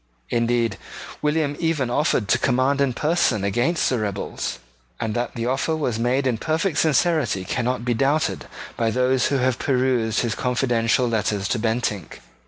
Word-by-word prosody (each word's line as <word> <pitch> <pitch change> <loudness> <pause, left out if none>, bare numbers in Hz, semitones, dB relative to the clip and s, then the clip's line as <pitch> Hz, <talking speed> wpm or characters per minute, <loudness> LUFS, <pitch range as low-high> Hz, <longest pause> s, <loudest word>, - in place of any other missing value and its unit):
Indeed 115 -3 +1 0.4
William 150 -1 0
even 155 -7 0
offered 125 -6 +1
to 120 - +3
command 130 +2 +2
in 140 -2 +2
person 150 - +1
against 120 - +1
the 125 - 0
rebels; 100 -2 -3 0.4
and 110 -1 -2
that 120 +1 -3
the 115 -1 -3
offer 135 +6 0
was 125 -8 -2
made 125 +4 +1
in 120 -4 0
perfect 160 +5 0
sincerity 155 - +2
cannot 120 +3 -2
be 120 - +1
doubted 140 +6 0 0.3
by 115 -1 0
those 125 +2 +2
who 140 - +1
have 130 -1 0
perused 125 -4 +1
his 120 -3 -1
confidential 125 -1 +1
letters 105 -3 -1
to 120 - 0
Bentinck. 110 -5 -2
125 Hz, 160 wpm, -23 LUFS, 115-140 Hz, 0.4 s, to